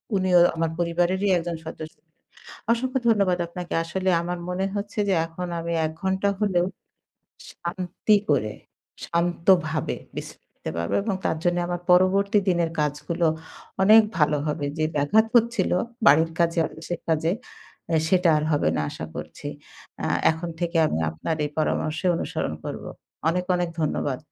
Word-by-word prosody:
উনিও 185 -2 +4 0.2
আমার 165 0 0
পরিবারেরই 175 +3 +1
একজন 170 0 -3
সদস্য। 155 0 -8 0.8
অসংখ্য 255 +3 0
ধন্যবাদ 200 -5 +3
আপনাকে। 175 0 -6
আসলে 185 +3 -2
আমার 175 +1 -4
মনে 185 +2 -1
হচ্ছে 205 +1 -4
যে - - +3
এখন 175 +2 -6
আমি 170 0 -4
১ 155 - -2
ঘন্টা 190 +1 +1
হলেও 185 -4 +2 0.9
শান্তি 180 +4 0
করে, 110 -7 +1 0.5
শান্তভাবে 170 -2 +1 0.2
বিশ্রাম - - -7
নিতে - - -6
পারবো 85 0 -2
এবং 205 -1 -1
তার - - 0
জন্যে 175 0 +2
আমার 175 -1 -2
পরবর্তী 195 +3 +4
দিনের 170 -2 +2
কাজগুলো 150 +3 -1 0.6
অনেক 215 +3 +8 0.2
ভালো 150 -1 +3
হবে। 150 -1 -2
যে 155 - +2
ব্যাঘাত 210 +11 +3
হচ্ছিলো 230 -6 +2 0.3
বাড়ির 160 +1 +6
কাজে, 170 0 +2
অফিসের 165 +2 -6
কাজে 160 0 +2 0.6
এ্যা 165 -2 +2
সেটা 180 -1 +4
আর 150 - -2
হবে 145 - +2
না 75 - 0
আশা 80 - -6
করছি। - - -8 0.5
অ্যা - - -1 0.2
এখন 165 +2 -5
থেকে 170 -1 -1
আমি 80 - -1
আপনার 115 - -3
এই 150 - -3
পরামর্শ 155 0 0 0.2
অনুসরণ - - -3
করবো। - - -5 0.4
অনেক, 180 +2 0
অনেক 175 -1 -1
ধন্যবাদ 145 -3 -1
175 Hz, 150 wpm, -24 LUFS, 160-190 Hz, 0.9 s, অনেক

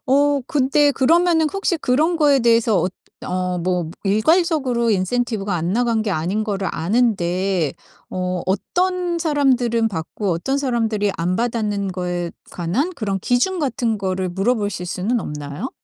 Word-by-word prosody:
어 285 +1 +3
근데 285 +1 +3
그러면은 325 +4 +3
혹시 390 -1 -1
그런 305 +6 +1
거에 290 -4 +4
대해서 230 -3 +3
엇 185 - -1 0.3
어 180 0 -2
뭐 175 -1 -1
일괄적으로 250 - +2
인센티브가 210 0 0
안나간 220 +7 0
게 215 - -2
아닌 185 +6 -1
거를 200 -3 -2
아는데 185 - 0 0.4
어 180 -1 -2
어떤 355 - 0
사람들은 255 -8 +2
받고 190 +2 -3
어떤 270 +12 -1
사람들이 225 -6 0
안 175 +2 0
받았는 210 -5 -1
거에 180 -1 -3 0.2
관한 185 - -1
그런 205 -8 -2
기준 250 - +1
같은 240 -5 0
거를 190 -2 -2
물어보실 205 0 -1
수는 200 +7 -1
없나요? 150 - -5
220 Hz, 305 characters per minute, -20 LUFS, 185-270 Hz, 0.4 s, 거에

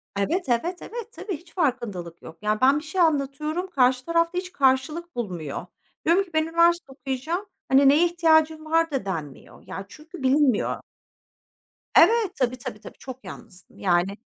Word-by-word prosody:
Evet, 265 - -1
evet, 340 +10 0
evet, 470 +1 -7
tabii, 385 -10 -5
hiç 340 +2 -21
farkındalık 235 - -2
yok. 165 - -11
Yani 210 +1 0
ben 270 +3 +5
bir - - -12
şey 325 +4 -1
anlatıyorum, 305 +3 0
karşı 255 -5 +2
tarafta 335 +1 +1
hiç 365 0 -3
karşılık 300 +4 +1
bulmuyor. 180 -10 -4 0.4
Diyorum 350 +5 +4
ki 380 - -17
"Ben 315 0 +3
üniversite 335 -2 +2
okuyacağım," 270 +8 -4 0.2
hani, 270 +1 +6
"Neye 305 +5 +5
ihtiyacın 315 -2 +2
var?" 330 0 +2
da 265 -8 -2
denmiyor. 155 -8 -6
Ya, 195 - -6
çünkü 310 - -11
bilinmiyor. 265 -3 +2 1.2
Evet, 450 -5 +5
tabii, 255 0 +1
tabii, 225 -3 -7
tabii - - -12
çok 260 -1 -9
yalnızdım. 190 -6 -12
Yani 185 +1 +1
290 Hz, 160 wpm, -25 LUFS, 240-335 Hz, 1.2 s, hani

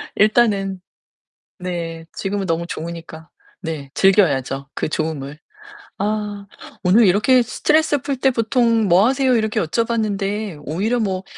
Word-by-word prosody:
일단은 200 -4 +2 0.8
네, 165 -2 -5
지금은 195 0 -3
너무 165 0 -1
좋으니까. 165 -1 -7 0.3
네, 155 -5 -5
즐겨야죠. 140 -8 +2
그 - - -2
좋음을. 150 -2 -4 0.5
아, 205 0 -3 0.4
오늘 205 +5 +5
이렇게 230 +7 +4
"스트레스 300 +4 +1
풀 275 0 -3
때 265 +1 +2
보통 230 -1 +2
뭐 185 +4 +5
하세요?" 265 -1 +2
이렇게 220 -1 0
여쭤봤는데 205 -2 -2
오히려 210 - -1
뭐 190 -3 -1
200 Hz, 275 characters per minute, -20 LUFS, 165-225 Hz, 0.8 s, 오늘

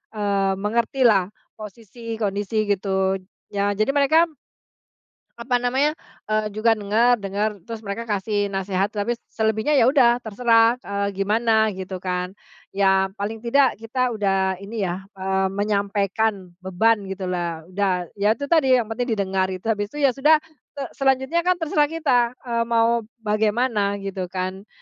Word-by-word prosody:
eee, 200 -2 +1
mengertilah 220 0 +2 0.3
posisi 225 +2 -8
kondisi 210 0 -1
gitu, 190 -1 0 0.3
ya 200 0 0
jadi 215 +6 +1
mereka 315 +4 +3 1.1
apa 245 +2 -1
namanya, 265 +5 +1 0.3
eee, 215 0 0
juga 220 +2 +2
dengar 220 +4 +3
dengar 205 0 -2
terus 225 +3 -7
mereka 210 +1 -5
kasih 205 -1 -1
nasehat 195 +1 -1
tapi 215 +3 -1 0.2
selebihnya 220 +5 0
ya 230 - +5
udah 245 -3 +4
terserah, 230 +1 +3
eee, 200 0 -3
gimana 220 +1 +2
gitu 190 0 -6
kan, 180 +1 -3 0.4
ya 195 -1 +3
paling 215 +2 -4
tidak 245 +1 +2
kita 245 +2 -1
udah 195 -3 0
ini 205 +1 -5
ya, 180 0 -2 0.2
eee, 190 0 0
menyampaikan 200 0 -1
beban 195 +3 +1
gitulah 180 -4 -3
udah 185 -3 -1
ya 210 +2 +3
itu 285 +1 -6
tadi 265 -7 +4
yang 220 - -12
penting 240 0 -1
didengar 190 -2 0
gitu 185 -1 -6
habis 205 -1 -2
itu 295 +6 -5
ya 275 - +5
sudah, 300 +4 +3 0.3
se 280 - -4 0.2
selanjutnya 270 +4 +2
kan 360 +1 +2
terserah 305 -3 +1
kita, 255 -7 +1
eee, 235 -2 -2
mau 230 -1 +2 0.2
bagaimana 210 -1 +1
gitu 195 -2 -5
kan, 185 +2 -5
215 Hz, 145 wpm, -22 LUFS, 195-235 Hz, 1.1 s, ya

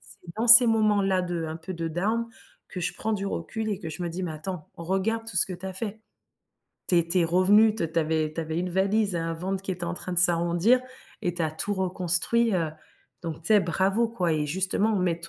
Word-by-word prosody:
c'est 170 -1 -14
dans 225 +2 0
ces 240 +1 +10
moments-là 205 -4 +2
de, 175 -2 -3
un 160 +1 -5
peu 165 +3 -7
de 165 -1 -4
down, 215 +8 -1 0.4
que 180 - -6
je - - -1
prends 220 0 -3
du 200 -1 -3
recul 220 +4 -4
et 195 - -2
que 165 -5 -7
je 175 +3 -6
me 175 - -2
dis: 185 +3 -5
«Mais 165 -3 -3
attends, 155 +1 -7
regarde 195 +6 -1
tout 215 - -6
ce - - +4
que 185 - -6
tu 180 +2 -12
as 190 - -5
fait. 215 +2 -5 0.9
Tu 175 - +4
es 170 0 0
tu 180 +2 +2
es - - +3
revenue, 205 +6 +4
t 165 -7 -3
tu 165 - 0
avais 155 -1 0
tu 165 - -2
avais 160 +1 -3
une 180 0 -2
valise 195 +2 +1
et 170 - 0
un 165 0 -2
ventre 190 +3 -4
qui 195 - -5
était 180 -1 -4
en 170 +1 -3
train 180 - -5
de 175 - +1
s'arrondir, 175 +7 +3 0.4
et 175 - 0
tu 175 - -7
as 155 - 0
tout 205 +6 -2
reconstruit, 190 +4 0
heu, 165 -3 0 0.5
donc 165 -1 -6
tu - - -7
sais, 215 -1 +6
bravo, 190 +6 +1
quoi, 180 -8 -1
et 150 -1 0
justement 190 +6 0
mais 180 -3 +1
t 170 - -9
180 Hz, 250 wpm, -26 LUFS, 170-205 Hz, 0.9 s, ces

